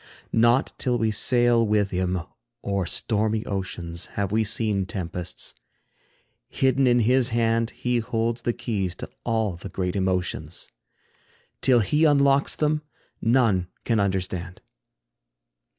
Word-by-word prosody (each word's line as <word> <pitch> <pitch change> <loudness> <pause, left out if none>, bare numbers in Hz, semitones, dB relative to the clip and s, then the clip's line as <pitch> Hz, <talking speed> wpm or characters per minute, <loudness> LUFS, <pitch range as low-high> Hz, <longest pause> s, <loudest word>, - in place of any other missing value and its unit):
Not 120 +4 +3
till 125 -2 +1
we 110 -2 +1
sail 120 +2 +3
with 105 -2 +1
him 90 0 0 0.4
o'er 100 -3 -1
stormy 110 0 0
oceans, 90 -3 -4
Have 100 -1 -1
we 110 +1 +2
seen 105 -3 0
tempests; 90 -1 -4 1.0
hidden 130 0 +2
in 120 -1 +4
his 125 +2 +3
hand 115 0 +1
He 125 -1 -1
holds 115 +1 -1
the 120 - 0
keys 100 -7 -3
to - - -8 0.2
all 110 -6 0
the 95 - -8
great 90 -1 -3
emotions; 90 -4 -2 0.9
Till 125 -3 +5
he 150 - +1
unlocks 140 -2 +4
them, 150 0 +1 0.4
none 115 -7 +2 0.2
can 115 -2 +2
understand. 95 -2 -2
110 Hz, 125 wpm, -25 LUFS, 95-120 Hz, 1.0 s, Till